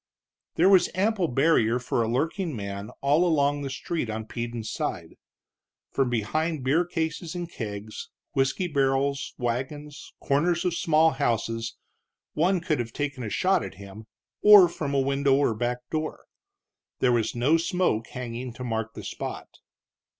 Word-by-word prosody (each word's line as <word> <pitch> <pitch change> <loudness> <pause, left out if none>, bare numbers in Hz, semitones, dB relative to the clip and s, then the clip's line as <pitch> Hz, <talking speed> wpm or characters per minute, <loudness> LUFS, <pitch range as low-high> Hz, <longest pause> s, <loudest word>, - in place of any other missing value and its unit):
There 175 - +4
was 190 -3 +6
ample 195 -1 +1
barrier 125 -4 +3
for 120 -1 -1
a 115 - 0
lurking 160 - -1
man 100 -1 -5
all 145 +5 +3
along 145 -4 +2
the 140 - -3
street 140 -1 -3
on 110 0 -4
Peden's 115 -1 -5
side. - - -4 0.8
From 135 -2 +1
behind 150 +7 -1
beer 155 +7 +2
cases 165 0 -3
and 175 -1 -3
kegs, 105 -7 -7 0.2
whisky 135 +6 +1
barrels, 140 -1 0
wagons, 135 +5 -4
corners 170 +5 +1
of 180 - +1
small 160 -2 +3
houses, 115 -4 -1 0.6
one 175 +3 +2
could 155 -4 0
have 115 -1 -4
taken 140 -3 -3
a 110 - -3
shot - - +2
at - - -7
him; 100 +3 -11 0.3
or 205 -3 +9
from 145 -4 -3
a - - +3
window 140 0 +2
or 140 -4 +2
back 125 +2 -3
door. 155 0 -3 0.7
There 125 - +3
was 115 -2 +1
no 135 +7 +3
smoke 165 -9 0
hanging 125 0 -6
to 125 - -8
mark 115 -2 -3
the - - -7
spot. - - -6
140 Hz, 155 wpm, -26 LUFS, 120-160 Hz, 0.8 s, or